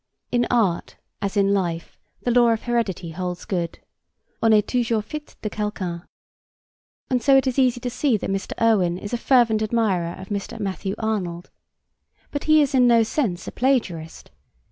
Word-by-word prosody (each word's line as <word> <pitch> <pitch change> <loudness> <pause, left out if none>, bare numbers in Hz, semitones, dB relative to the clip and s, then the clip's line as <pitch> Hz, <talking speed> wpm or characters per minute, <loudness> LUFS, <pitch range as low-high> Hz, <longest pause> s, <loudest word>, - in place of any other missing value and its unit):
In 240 0 +2
art 210 -8 0 0.2
as 200 +1 -2
in 200 0 +3
life 170 -4 -2 0.3
the 245 - +1
law 240 0 +5
of 225 -1 0
heredity 205 -8 -1
holds 180 +1 -5
good. 170 -3 -2 0.6
On 225 - +4
est 210 -1 +4
toujours 230 -3 0
fits 300 +3 -8
de - - -1
quelqu'un. 190 -5 -3 1.1
And 250 -1 +2
so 275 +1 +5
it 270 - +3
is 260 0 0
easy 250 -2 +3
to 245 - -2
see 250 -2 +1
that 195 - -4
Mr. 195 0 -3
Irwin 195 -7 +3
is 205 +4 -7
a - - +1
fervent 235 -3 +3
admirer 205 -6 0
of 190 - -10
Mr. 205 +2 -4
Matthew 195 -1 -3
Arnold. 185 -6 -3 0.8
But 285 - -4
he 310 -1 +6
is 280 - -2
in 250 -2 +5
no 230 -1 +5
sense 215 - -2
a - - -4
plagiarist. 190 - -1
215 Hz, 175 wpm, -23 LUFS, 185-245 Hz, 1.1 s, he